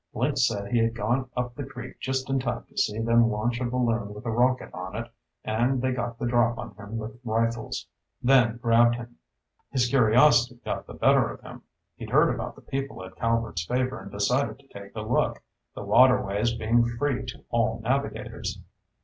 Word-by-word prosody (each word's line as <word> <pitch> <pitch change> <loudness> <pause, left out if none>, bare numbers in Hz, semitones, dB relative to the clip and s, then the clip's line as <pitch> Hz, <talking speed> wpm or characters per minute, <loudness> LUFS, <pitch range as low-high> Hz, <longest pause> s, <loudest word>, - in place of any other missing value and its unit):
Link 125 +6 0
said 105 -5 0
he 120 - +3
had 115 0 +1
gone 120 +4 -1
up 125 -1 -2
the 140 - -6
creek 135 -2 -9
just 130 -1 -2
in 135 0 +1
time 120 -2 -3
to - - -24
see 105 +1 0
them 115 +1 +4
launch 120 +3 -1
a - - 0
balloon 120 -4 -1
with 105 - -10
a 115 - -1
rocket 125 +3 +1
on 90 +2 -6
it, 115 +1 -5 0.3
and 120 +5 +1
they 130 +1 0
got 120 -2 -3
the 120 - -3
drop 120 -1 +2
on - - -7
him 105 +2 -7
with 110 +1 -7
rifles, 115 0 -1 0.3
then 120 -3 +4
grabbed 120 0 +4
him. 120 0 -9 0.5
His 125 -3 +1
curiosity 120 0 +4
got - - -3
the - - -9
better - - +4
of - - -9
him. - - -11 0.4
He'd - - -8
heard - - +4
about - - -5
the - - -15
people 135 -8 -4
at 95 0 -12
Calvert's 115 -7 -1
Favor 130 +1 -1
and 100 - -10
decided 125 +8 0
to 140 0 -23
take 100 +1 -11
a 110 - -3
look, 110 +3 0 0.3
the - - -6
waterways 115 -3 +4
being 115 +1 +2
free 135 -1 0
to - - -8
all 115 -1 +1
navigators. 135 +5 -2
120 Hz, 195 wpm, -26 LUFS, 110-125 Hz, 0.5 s, them